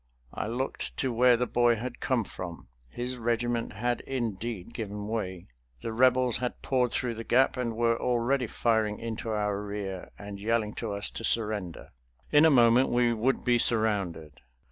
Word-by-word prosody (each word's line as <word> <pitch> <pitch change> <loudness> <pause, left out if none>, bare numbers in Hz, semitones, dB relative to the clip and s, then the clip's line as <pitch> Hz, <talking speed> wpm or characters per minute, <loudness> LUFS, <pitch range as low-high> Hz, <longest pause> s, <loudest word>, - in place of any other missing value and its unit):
I - - -3
looked 125 +4 -3
to 130 -3 0
where 125 +1 +5
the 125 - 0
boy 120 0 +3
had 120 +2 -6
come 125 -4 +1
from. 85 - -8 0.2
His 125 - -4
regiment 120 0 -1
had 120 +4 -1
indeed 115 -5 -4
given 105 -2 -5
way. 95 -5 -3 0.4
The 115 - -4
Rebels 125 0 +3
had 125 0 -4
poured 125 -3 +1
through 125 -2 -1
the 115 0 -6
gap 130 +3 +3
and 120 -3 -2
were 115 0 +1
already 125 +1 +1
firing 110 -2 +1
into 115 0 -5
our 105 -2 -1
rear 100 -3 -5
and 100 -1 -8
yelling 110 0 0
to 115 -3 -3
us 100 0 -2
to - - -7
surrender. 105 -7 -1 0.4
In 150 +1 +6
a - - +7
moment 125 -1 +5
we 120 -1 +3
would 120 +4 0
be 120 -1 +4
surrounded. 95 - 0
115 Hz, 170 wpm, -28 LUFS, 105-125 Hz, 0.4 s, a